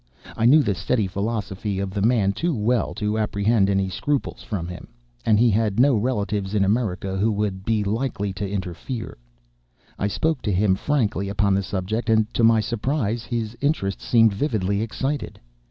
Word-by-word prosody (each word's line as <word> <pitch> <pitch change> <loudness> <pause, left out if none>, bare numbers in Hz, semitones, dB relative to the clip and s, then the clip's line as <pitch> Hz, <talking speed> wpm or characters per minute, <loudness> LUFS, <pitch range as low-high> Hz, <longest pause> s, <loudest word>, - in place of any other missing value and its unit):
I 115 - 0
knew 150 +4 +6
the 100 - +1
steady 100 +5 0
philosophy 100 0 -3
of 95 0 -2
the 100 +1 -3
man 105 -3 +3
too 165 +6 -1
well 115 +2 0
to 105 +1 -1
apprehend 105 -1 +2
any 95 -1 +1
scruples 140 +9 -2
from 90 -6 -4
him; 90 0 -8 0.4
and 110 - +5
he 120 +1 +4
had 105 0 +1
no 135 0 +5
relatives 105 -3 -1
in 100 -1 +3
America 95 -3 -1
who 110 +3 +2
would 100 -2 -2
be 110 -1 +1
likely 105 -2 -2
to 100 +1 -4
interfere. 100 +5 -5 0.8
I 100 - +1
spoke 150 - -1
to 105 - -1
him 95 +1 +3
frankly 105 -3 0
upon 100 0 +1
the 100 - +2
subject; 100 +5 -3
and, 110 -1 +2
to 115 - +1
my 115 -1 +5
surprise, 115 +1 -1
his 115 -2 -3
interest 140 -10 0
seemed 115 -3 +4
vividly 100 -4 0
excited. 130 +5 -3
105 Hz, 175 wpm, -23 LUFS, 100-115 Hz, 0.8 s, knew